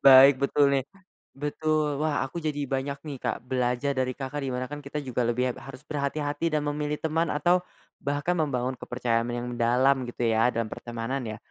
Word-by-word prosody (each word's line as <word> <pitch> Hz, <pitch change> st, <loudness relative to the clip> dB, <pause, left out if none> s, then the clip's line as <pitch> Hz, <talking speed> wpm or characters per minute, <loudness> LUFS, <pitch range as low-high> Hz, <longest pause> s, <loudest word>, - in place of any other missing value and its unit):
baik 135 Hz, 0 st, +9 dB
betul 140 Hz, 0 st, +4 dB
nih, 135 Hz, -2 st, +2 dB, 0.5 s
betul 150 Hz, +1 st, 0 dB
wah 150 Hz, -2 st, +1 dB
aku 155 Hz, -, -8 dB
jadi 145 Hz, -2 st, -1 dB
banyak 135 Hz, +1 st, -2 dB
nih 140 Hz, -3 st, -4 dB
Kak -, -, 0 dB
belajar 125 Hz, +2 st, 0 dB
dari 130 Hz, -1 st, +1 dB
Kakak 135 Hz, +2 st, -4 dB
dimana 130 Hz, -1 st, -2 dB
kan 145 Hz, 0 st, -7 dB
kita 140 Hz, +2 st, -4 dB
juga 125 Hz, -3 st, -1 dB
lebih 125 Hz, +1 st, +1 dB
heb -, -, -12 dB
harus 135 Hz, 0 st, -9 dB
berhati-hati 145 Hz, +2 st, -1 dB
dan 150 Hz, -, +1 dB
memilih 150 Hz, 0 st, -1 dB
teman 160 Hz, +1 st, 0 dB
atau, 175 Hz, +5 st, +3 dB, 0.4 s
bahkan 145 Hz, +5 st, 0 dB
membangun 130 Hz, -5 st, 0 dB
kepercayaan 120 Hz, -2 st, -1 dB
yang 120 Hz, 0 st, -3 dB
mendalam 125 Hz, +3 st, +3 dB
gitu 120 Hz, -, -2 dB
ya 115 Hz, +1 st, +4 dB
dalam 115 Hz, -1 st, -1 dB
pertemanan 120 Hz, +4 st, -4 dB
ya. 110 Hz, -1 st, -5 dB
135 Hz, 185 wpm, -27 LUFS, 125-145 Hz, 0.5 s, baik